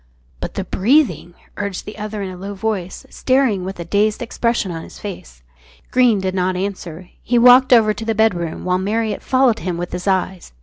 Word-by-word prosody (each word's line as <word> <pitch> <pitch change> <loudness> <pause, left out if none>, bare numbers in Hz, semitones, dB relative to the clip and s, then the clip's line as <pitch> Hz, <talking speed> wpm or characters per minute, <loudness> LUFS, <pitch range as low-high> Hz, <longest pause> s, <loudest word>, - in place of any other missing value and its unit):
"But - - -6
the - - -2
breathing?" 230 - +1 0.2
urged 200 -2 -4
the 215 +1 -9
other 210 -1 -4
in 190 - -5
a - - -8
low 195 +3 -7
voice, 195 -3 -4
staring 255 -8 +1
with 190 0 -6
a 170 - -5
dazed 210 +6 +1
expression 230 -4 -1
on 165 -1 -5
his - - -12
face. 60 - -9 0.5
Greene 245 -5 +4
did 190 -1 -2
not 185 0 0
answer. 180 -2 -5
He 245 - 0
walked 250 +2 +7
over 220 -3 +5
to 225 - -7
the 225 0 -1
bedroom, 180 -8 0
while 180 0 +1
Marriott 215 +2 -1
followed 255 -4 +2
him 180 -2 -3
with 175 0 -5
his 180 +2 -5
eyes. 185 - -1
200 Hz, 200 wpm, -19 LUFS, 185-225 Hz, 0.5 s, walked